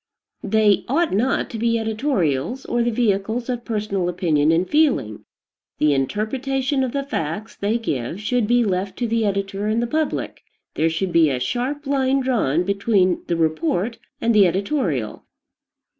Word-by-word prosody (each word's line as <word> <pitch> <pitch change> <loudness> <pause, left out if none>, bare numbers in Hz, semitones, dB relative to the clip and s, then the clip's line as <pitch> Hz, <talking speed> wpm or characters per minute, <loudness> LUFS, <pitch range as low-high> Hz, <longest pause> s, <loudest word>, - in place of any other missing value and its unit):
They 210 -1 +3
ought 325 - +1
not, 240 +7 +1
to 225 - -5
be 230 0 +2
editorials, 220 - -1
or 240 - 0
the 235 - +2
vehicles 220 +1 0
of 245 -1 -2
personal 205 -6 -2
opinion 160 -4 +2
and 170 +3 +2
feeling. 280 - +1 0.5
The 150 -1 +3
interpretation 260 - -1
of, 255 - -2
the 280 +1 -2
facts 200 - -4
they 210 +3 0
give 160 - -3
should 220 +1 0
be 240 0 +3
left 190 0 -2
to 240 - -1
the 225 0 +1
editor 195 0 -2
and 220 +2 +1
the 235 - 0
public. 310 +5 -2 0.3
There 160 +1 +1
should 175 +3 -2
be 165 -2 +4
a 130 -2 -1
sharp 255 - -2
line 270 -1 +1
drawn 210 - +1
between 200 -1 +1
the 170 - 0
report 165 +7 0 0.2
and 230 0 +1
the 205 -3 +6
editorial. 175 - -1
215 Hz, 160 wpm, -21 LUFS, 175-245 Hz, 0.5 s, the